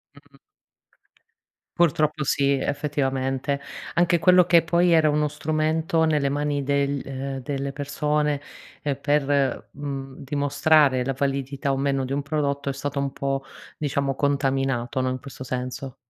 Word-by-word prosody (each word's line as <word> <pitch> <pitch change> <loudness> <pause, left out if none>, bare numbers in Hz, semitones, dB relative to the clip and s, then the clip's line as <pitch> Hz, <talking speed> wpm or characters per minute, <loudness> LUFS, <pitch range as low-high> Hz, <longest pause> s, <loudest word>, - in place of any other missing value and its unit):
Mh. 140 -1 -20 1.4
Purtroppo 155 -2 +2
sì, 140 0 +2
effettivamente, 135 -1 -1 0.3
anche 175 +1 +3
quello 180 +1 +6
che 170 -2 +5
poi 170 +1 +3
era 160 -2 +5
uno 150 0 +1
strumento 155 +2 0
nelle 150 -3 +2
mani 145 +1 -1
del, 140 0 0
ehm, 135 0 -4
delle 140 +1 -3
persone 150 +1 -1 0.6
per, 140 -2 +1
mhmm, 135 -2 -6
dimostrare 145 -1 +2
la 135 - -1
validità 140 0 -1
o 135 - 0
meno 135 0 0
di 130 - -5
un 140 +1 0
prodotto 140 -1 -2
è - - -1
stato 140 +1 -3
un 140 -1 -2
po', 135 0 -2 0.3
diciamo, 140 -2 -1
contaminato 135 -3 0
no, 130 - +1
in 130 0 -3
questo 135 -1 -9
senso. 125 +1 -4
140 Hz, 140 wpm, -24 LUFS, 135-150 Hz, 1.4 s, quello